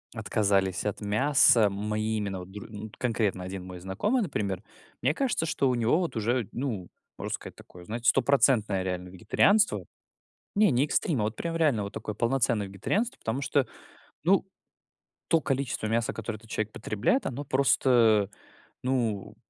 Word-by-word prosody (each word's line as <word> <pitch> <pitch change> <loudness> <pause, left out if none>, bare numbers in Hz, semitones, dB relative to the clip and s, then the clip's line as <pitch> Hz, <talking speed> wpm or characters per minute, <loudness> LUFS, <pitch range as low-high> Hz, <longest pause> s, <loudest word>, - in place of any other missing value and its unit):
отказались 100 -3 +1
от 105 +1 -2
мяса, 110 0 +4
мои 105 +2 -2
именно 100 -3 -3
вот 90 +1 -10
др 105 0 -8
Ну 105 0 -8
вот 110 - -10
конкретно 105 -6 0
один 95 0 -6
мой 90 -1 -8
знакомый, 105 - 0
например, 105 - -2 0.4
мне 135 +4 +2
кажется, 245 -10 0
что 140 -4 +1
у 125 - +1
него 120 +8 +2
вот 170 -8 -2
уже, 115 0 0
ну, 115 -9 -3 0.3
можно - - -4
сказать, - - -6
такое, 90 -1 -14
знаете, 115 +4 +1
стопроцентное 120 -7 +3
реально 90 -1 -3
вегетарианство. 200 - +2 0.7
Не, 210 -2 +5
не 130 +3 +3
экстрим, 150 -3 0
а - - +1
вот 110 +1 -3
прям 165 -1 -3
реально 145 -10 +2
вот 100 - -6
такое 105 - -5
полноценное 115 -3 +1
вегетарианство. 200 - -1
Потому 115 +5 -2
что, 140 -2 +1 0.6
ну - - +3 0.9
то 165 -1 +4
количество 135 -5 -1
мяса, 115 +1 0
которое 110 -2 -4
этот 115 - -19
человек 110 -1 -2
потребляет, 110 - 0
оно 135 +3 -4
просто, 135 0 +2 0.4
э, - - -22 0.5
ну 115 -6 -1
110 Hz, 165 wpm, -28 LUFS, 100-135 Hz, 0.9 s, Не